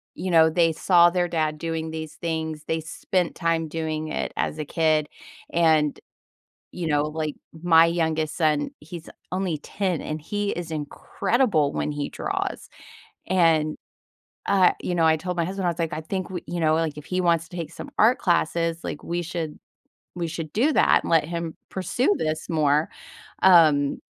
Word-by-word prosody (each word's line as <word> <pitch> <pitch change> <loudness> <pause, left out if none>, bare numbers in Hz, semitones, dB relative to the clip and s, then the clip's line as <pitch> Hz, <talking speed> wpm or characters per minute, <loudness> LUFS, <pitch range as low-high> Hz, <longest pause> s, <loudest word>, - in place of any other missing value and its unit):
you 185 -1 -3
know, 160 -1 +6
they 165 0 +3
saw 175 +1 +5
their 175 -1 +1
dad 155 -2 -1
doing 160 -1 -3
these 160 -1 -6
things, 160 -2 -3
they 160 - 0
spent 175 +3 -2
time 165 -1 0
doing 155 0 -3
it - - -3
as - - -1
a 150 - -3
kid, 155 -1 +1 0.5
and, 160 -3 +3 0.7
you 175 -2 -4
know, 145 -1 +2
like, 155 -1 -3 0.3
my 165 -1 +6
youngest 160 -3 0
son 150 -3 +1
he's 160 +1 -10 0.2
only 185 -3 -1
10, 185 -1 -2
and 155 0 -5
he 205 +4 -2
is 170 -2 -5
incredible 155 - 0
when - - -2
he 145 -1 -3
draws, - - -4 0.6
and 165 -4 +2 0.7
uh, 190 -2 +5
you 180 - -3
know, 165 - +3
I 160 - +4
told 180 +3 -4
my 170 - +1
husband, 190 +1 -3
I 175 - +3
was 170 - -6
like, 165 -2 -1
"I - - -3
think 185 +2 -4
we" 180 -2 -5
you 175 - -3
know, 155 -1 +3
like, 160 -2 -1
"if 150 - -9
he 185 0 -1
wants 170 -2 +1
to 180 - -10
take 165 -3 -4
some - - -9
art 230 +4 +5
classes," 170 -1 0
like, - - -5
"we 175 +1 -2
should 165 -2 -4 0.6
we 175 -1 -2
should 160 -1 -5
do 270 +9 +2
that - - +4
and - - -4
let 165 -2 +4
him 170 -1 -4 0.2
pursue 205 +4 0
this 155 +1 -2
more." 150 -1 +2 0.5
Um... 155 -6 +5
165 Hz, 180 wpm, -24 LUFS, 155-175 Hz, 0.7 s, know